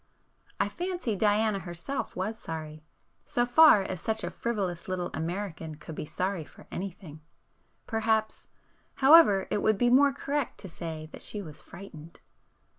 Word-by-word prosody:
I - - +2
fancy 350 - -3
Diana 210 0 +2
herself 175 +9 -5
was 195 +5 -2
sorry, 155 -5 -7 0.4
so 240 - 0
far 245 -4 +7
as 185 -2 -5
such 220 0 -1
a - - -3
frivolous 200 -5 -3
little 180 -1 -3
American 165 -1 -4
could 160 +1 -10
be 150 - -5
sorry 185 0 -2
for - - -17
anything,—perhaps, 200 +5 -4 0.5
however 265 - +6
it 205 - +1
would 215 -2 +3
be 240 +2 +3
more 280 +2 +6
correct 280 +1 -3
to 195 - -8
say 160 -2 -6
that - - -9
she 210 -1 -3
was 155 -4 -11
frightened. 170 -4 -12
195 Hz, 145 wpm, -28 LUFS, 170-225 Hz, 0.5 s, far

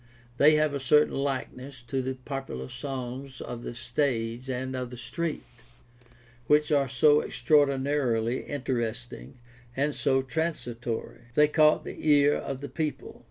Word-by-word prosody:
They 150 +4 +6
have 155 -1 +2
a 140 - -2
certain 150 +3 +4
likeness 135 -1 -4
to 130 +3 -2
the 130 +1 -3
popular 130 - -6
songs 130 -1 -6
of 120 -1 -6
the 120 - -6
stage 120 -1 -1
and 130 +1 -3
of 125 -1 -3
the 125 - -9
street, 160 +6 -3 1.0
which 150 +1 +3
are 140 -2 +3
so 145 +4 +5
extraordinarily 135 -3 +1
interesting 120 - -4 0.4
and 145 +2 +1
so 135 -1 +1
transitory. 120 -6 -4
They 150 0 +6
caught 155 0 +4
the - - -7
ear 145 0 +6
of 135 -1 -4
the 145 - -6
people. 150 +2 -4
135 Hz, 140 wpm, -28 LUFS, 120-145 Hz, 1.0 s, They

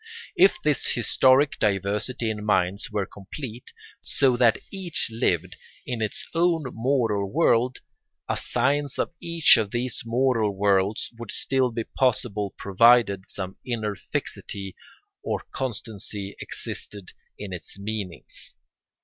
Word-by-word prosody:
If 380 +2 +5
this 150 -3 +1
historic 130 +4 +3
diversity 105 +4 0
in 105 -1 -5
minds 100 -1 +1
were 105 -2 -1
complete, 115 +6 -9 0.3
so 130 -3 +2
that 120 -2 +4
each 185 -9 +1
lived 90 -5 0 0.3
in 120 -3 -3
its 110 - -3
own 165 -1 +2
moral 115 -5 0
world, 130 -5 +2 0.5
a - - 0
science 145 0 0
of - - -1
each 170 -5 +5
of 110 -3 0
these 120 +2 -2
moral 115 -3 +1
worlds 100 +1 +1
would 120 -3 -7
still 130 -1 +1
be 115 0 -2
possible 110 -6 0
provided 100 -1 +4
some 95 -1 -6
inner 110 -4 -2
fixity 95 0 -5 0.5
or - - -2
constancy 105 -5 -4
existed 100 -3 -7 0.3
in 100 -3 -6
its 85 +2 -7
meanings. 100 -4 -6
110 Hz, 125 wpm, -25 LUFS, 100-130 Hz, 0.5 s, If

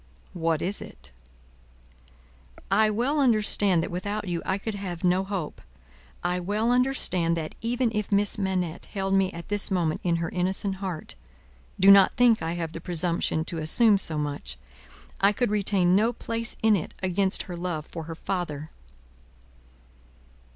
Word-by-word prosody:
"What 165 -2 -1
is 195 +3 -1
it?" - - -9 1.6
"I 215 +2 +4
well 245 +8 0
understand 210 -8 +3
that, - - -5
without 205 +3 -4
you, 175 -2 -2
I 190 - +1
could 220 +2 -5
have 185 -4 -6
no 180 +1 +3
hope. 190 -6 -5 0.6
I 180 +1 0
well 210 +6 0
understand 215 -10 +2
that, 155 -1 -4
even 240 +1 0
if 210 -1 -2
Miss 205 +1 +1
Manette 185 -4 -2
held 195 -1 -2
me 195 -1 +2
at 170 0 -9
this 205 -1 +1
moment 175 -5 0
in 170 -2 +1
her 165 0 -2
innocent 190 +2 -1
heart 185 -5 -5 0.7
do 195 +1 +8
not 195 -1 +6
think 240 -2 +4
I 165 +1 -2
have 165 -2 -4
the 165 - -8
presumption 170 -2 0
to 165 - -4
assume 200 +6 +4
so 160 -5 -2
much 145 - -4 0.6
I 200 +1 +4
could 225 +1 -1
retain 195 -3 +2
no 225 +4 +2
place 230 0 -3
in 220 -1 +5
it 175 - -4
against 190 +1 +2
her 180 - -7
love 170 -3 -4
for 165 -2 -8
her 165 0 -7
father." 160 -4 -4
190 Hz, 160 wpm, -26 LUFS, 170-210 Hz, 1.6 s, do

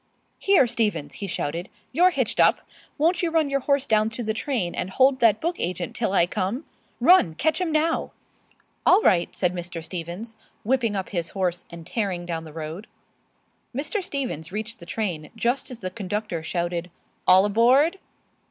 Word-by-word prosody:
"Here, 390 -9 +5
Stevens!" 215 - -1
he 200 - -6
shouted, 170 +1 -3 0.2
"you're 350 +7 +5
hitched - - -1
up! - - +5 0.4
Won't 330 +3 +2
you 345 - +1
run 320 -3 +1
your 275 - +2
horse 280 0 +1
down 215 0 +2
to 230 +2 -6
the 220 0 -1
train 220 - -2
and 185 - -3
hold 260 +5 +3
that 220 -3 +4
book 340 +2 -2
agent 175 -1 -3
till - - -1
I 185 -3 +4
come? 195 - -3 0.3
Run! 340 - +5
Catch 315 - 0
'im 350 -3 0
now!" 315 +2 +1 0.7
"All 405 +4 +5
right," 175 -2 +3
said 180 -1 +1
Mr. 175 -1 -6
Stevens, 180 +7 -6 0.3
whipping 235 -2 +1
up 190 -1 -3
his 170 -4 -2
horse 180 -3 -2
and 170 -1 -10
tearing 185 -3 -2
down 165 -2 -4
the 155 - -10
road. 160 +6 -7 0.9
Mr. 300 - -2
Stevens 245 - -3
reached 220 +3 -4
the 170 - -12
train 175 -9 -3
just 240 +4 -1
as 250 - -7
the 185 -1 -4
conductor 205 -3 -3
shouted, 170 +1 -2 0.4
"All 185 +2 +7
aboard!" 255 - +4
210 Hz, 175 wpm, -24 LUFS, 175-270 Hz, 0.9 s, All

